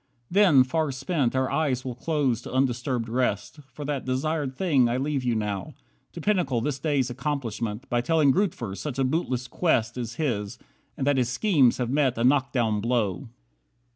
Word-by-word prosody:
Then, 180 -9 +6
far 155 +3 -1
spent, 135 -1 -1
Our 130 0 0
eyes 135 -5 0
will 125 - -3
close 130 -3 0
to - - -9
undisturbed 125 -2 0
rest. 125 +3 -1
For 145 +3 -7
that 140 -2 -2
desired 135 +1 -2
thing 140 -8 +2
I 120 - 0
leave 140 0 -1
you 120 -2 +1
now. 105 -3 -3 0.4
To - - -7
pinnacle 175 - +1
this 135 +3 -2
day's 135 -4 0
accomplishment, 120 -4 -3
By 120 0 0
telling 155 +1 +3
Grootver 130 - -1
that 145 -4 -4
a 135 - +2
bootless 130 -3 -1
quest 120 -5 0
Is 115 -1 -5
his, 105 -10 -2 0.4
and 135 - -2
that 145 -1 +2
his 125 -2 +1
schemes 135 - +3
have 125 -1 -2
met 135 -4 +1
a 115 - 0
knock 135 +1 +3
down 110 -5 0
blow." 115 -4 -1
130 Hz, 180 wpm, -26 LUFS, 120-145 Hz, 0.4 s, Then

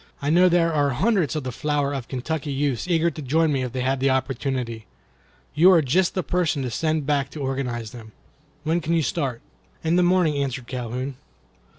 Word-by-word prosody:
I 145 +1 -1
know 180 +2 +5
there 170 -1 +2
are 145 -2 +2
hundreds 180 - +1
of 155 - -2
the 130 - -4
flower 145 +2 -1
of 135 -4 -4
Kentucky 145 +3 -3
youths 140 -1 -1
eager 170 -1 +2
to 155 - -8
join 155 +4 +2
me 135 - 0
if 125 -1 -3
they 130 +1 -3
had 130 +1 0
the 135 +1 +2
opportunity. 130 -3 -2 0.7
You 165 +5 +6
are 165 -3 +5
just 175 +7 +1
the 185 - 0
person 170 -6 0
to 125 - -3
send 155 +4 -1
back 140 -1 0
to 155 - -9
organize 130 -5 -3
them. 110 -3 -11 0.5
When 165 +3 0
can 165 +2 0
you 165 - +2
start?" 135 -4 -2 0.4
"In 165 +2 +2
the - - +5
morning," 175 -5 +2
answered 130 -2 -4
Calhoun. 125 +2 -4
140 Hz, 205 wpm, -23 LUFS, 130-160 Hz, 0.7 s, You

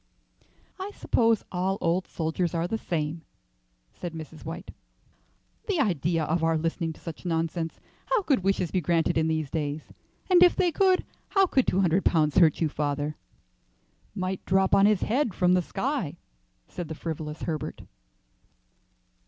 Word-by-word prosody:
"I 380 +2 -4
suppose 230 -2 +2
all 190 +2 0
old 175 +2 0
soldiers 165 +2 -2
are 165 +1 0
the 225 +4 -2
same," 160 -2 -2 0.7
said 175 -2 -6
Mrs. 160 0 -9
White. 165 +3 -7 1.0
"The 395 -6 0
idea 170 - +1
of 160 +2 0
our 165 0 +3
listening 165 +1 -1
to - - -18
such 165 -3 -8
nonsense! 165 -1 -2 0.3
How 485 -5 +2
could 285 -7 +2
wishes 190 -3 +1
be 185 - +1
granted 165 0 +1
in 160 0 +2
these 155 -3 -1
days? 150 -1 -3 0.3
And 360 -2 +5
if 360 -1 +7
they 360 -2 +2
could, 375 +2 +3 0.2
how 390 -1 +4
could 265 -8 +1
two 190 - +2
hundred 180 +1 +2
pounds 155 0 +3
hurt 165 -3 +4
you, 160 - +3
father?" 145 0 -2 1.0
"Might 185 -1 -3
drop 190 +1 +2
on 200 +1 +6
his 210 -3 +3
head 235 -3 0
from 180 0 +3
the 180 - +4
sky," 245 - -2 0.5
said 175 - -6
the 160 - -6
frivolous 155 -1 -5
Herbert. 155 -4 -4
170 Hz, 160 wpm, -27 LUFS, 160-195 Hz, 1.0 s, if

